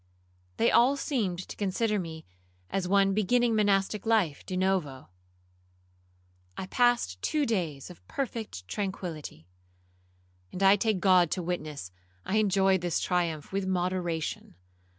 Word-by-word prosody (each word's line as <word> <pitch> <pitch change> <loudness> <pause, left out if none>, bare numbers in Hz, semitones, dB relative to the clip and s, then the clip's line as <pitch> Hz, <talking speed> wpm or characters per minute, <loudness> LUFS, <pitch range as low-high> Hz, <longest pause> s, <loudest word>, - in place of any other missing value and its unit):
They - - +3
all 260 +4 +4
seemed 195 - -2
to - - -8
consider 210 +2 0
me 160 -3 -7 0.5
as 190 -2 -1
one 195 0 +3
beginning 230 +3 +2
monastic 200 -1 +1
life 210 -11 +1
de 185 - -4
novo. 180 - -1 1.5
I - - -4
passed 240 - +1
two 300 -2 0
days 170 - -2
of 175 - -17
perfect 230 - -5
tranquillity, 170 - -5 1.0
and 190 - -3
I 195 +1 +7
take 205 -2 0
God 185 -3 +5
to 180 - -2
witness, 155 - -4 0.3
I 215 - 0
enjoyed 195 -3 +3
this 175 -1 0
triumph 170 -4 -1
with 195 0 -2
moderation. 180 - -2
190 Hz, 130 wpm, -28 LUFS, 170-210 Hz, 1.5 s, I